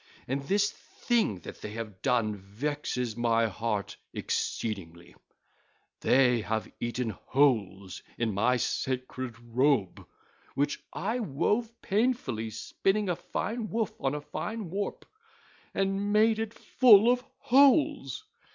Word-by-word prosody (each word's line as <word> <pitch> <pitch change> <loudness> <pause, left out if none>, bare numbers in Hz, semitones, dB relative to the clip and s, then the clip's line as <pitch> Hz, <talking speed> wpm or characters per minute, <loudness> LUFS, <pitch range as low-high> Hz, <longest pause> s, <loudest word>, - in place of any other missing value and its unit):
And 135 +2 -1
this 200 +8 +1
thing 220 - -1
that - - -10
they 105 - -6
have 110 -4 -7
done 115 -5 +1
vexes 125 +3 -3
my 115 -1 +2
heart 105 -1 -3 0.2
exceedingly: 85 -5 -3 0.9
they 125 -3 +4
have 110 +1 -2
eaten 120 -1 -2
holes 100 -5 0 0.2
in 115 -3 0
my 120 +6 +2
sacred 130 -1 -3
robe, 120 -3 +1 0.5
which 145 +1 0
I 220 +7 -2
wove 215 - 0
painfully 205 - 0
spinning 195 - -1
a 175 - +1
fine 220 +5 -4
woof 225 -3 -1
on 135 +1 0
a 150 - -4
fine 195 +5 -5
warp, 200 +2 -3 0.7
and 195 +1 0
made 220 +1 +4
it 225 0 -3
full 225 -4 +6
of 250 0 0
holes. 280 - +3
135 Hz, 120 wpm, -29 LUFS, -, 0.9 s, full